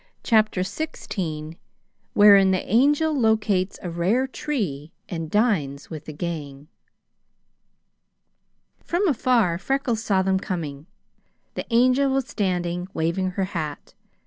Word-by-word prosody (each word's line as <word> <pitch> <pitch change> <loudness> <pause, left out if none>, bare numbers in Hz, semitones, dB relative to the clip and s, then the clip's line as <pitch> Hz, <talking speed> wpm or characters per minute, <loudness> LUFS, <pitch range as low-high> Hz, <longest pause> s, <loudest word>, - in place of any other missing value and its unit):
CHAPTER 215 -5 +2
XVI 175 - -4 0.6
Wherein 200 -2 +7
the 185 -1 0
Angel 290 - +3
Locates 215 -7 +1
a 175 - -4
Rare 190 +10 +1
Tree 200 - -4 0.2
and 165 -3 -5
Dines 160 - 0
with 155 -1 -7
the - - -7
Gang 150 -3 -6 2.2
From 365 +4 0
afar 235 - +2
Freckles 255 -1 -1
saw 195 -4 +2
them 190 0 +1
coming. 155 -6 -5 0.7
The - - -5
Angel 255 +3 +3
was 270 -1 0
standing, 180 -6 -2
waving 170 +4 0
her 195 - +1
hat. 155 -4 -5
190 Hz, 115 wpm, -24 LUFS, 165-240 Hz, 2.2 s, Wherein